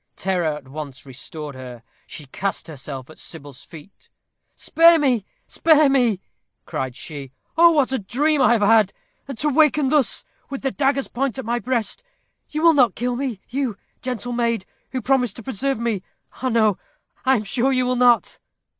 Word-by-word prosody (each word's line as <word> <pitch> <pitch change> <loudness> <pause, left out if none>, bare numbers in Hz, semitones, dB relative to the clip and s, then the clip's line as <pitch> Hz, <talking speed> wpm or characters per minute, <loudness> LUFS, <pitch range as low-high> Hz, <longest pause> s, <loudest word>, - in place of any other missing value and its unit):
Terror 175 -5 0
at 140 -3 -14
once 140 -2 -8
restored 145 +3 -7
her. 125 -3 -10 0.2
She 150 - -8
cast 190 +7 -3
herself 135 -4 -7
at - - -15
Sybil's 145 -5 -7
feet. 165 +4 -15 0.5
"Spare, 335 +1 +5 0.5
spare 310 -3 +4
me!" 245 -8 +2 0.5
cried 130 -2 -4
she. 140 -3 -7 0.2
"Oh! 340 +2 +7
what 285 -4 +2
a 265 - 0
dream 285 +9 +1
I 255 - +5
have 220 -3 +2
had. 215 -1 +4 0.3
And 275 -4 -6
to 300 +6 +1
waken 300 -1 +3
thus, 295 - +1 0.2
with 275 -1 -6
the 270 - 0
dagger's 275 0 +1
point 270 0 -2
at 265 - -5
my 240 +2 0
breast. 245 - -2 0.5
You 305 +1 -3
will 335 -1 +7
not 250 -9 +4
kill 245 +1 -1
me 245 -6 -3
you, 255 -5 -2 0.2
gentle 245 -2 -4
maid, 235 -4 0 0.3
who 255 -3 -3
promised 250 -5 +1
to 235 - -9
preserve 270 +2 -1
me. 225 -4 -1 0.4
Ah, 260 - 0
no, 220 -4 +2 0.4
I 265 0 +4
am 215 - -1
sure 245 +6 +1
you 255 -1 +2
will 250 0 +1
not." 245 -1 +3
240 Hz, 175 wpm, -22 LUFS, 180-270 Hz, 0.5 s, Oh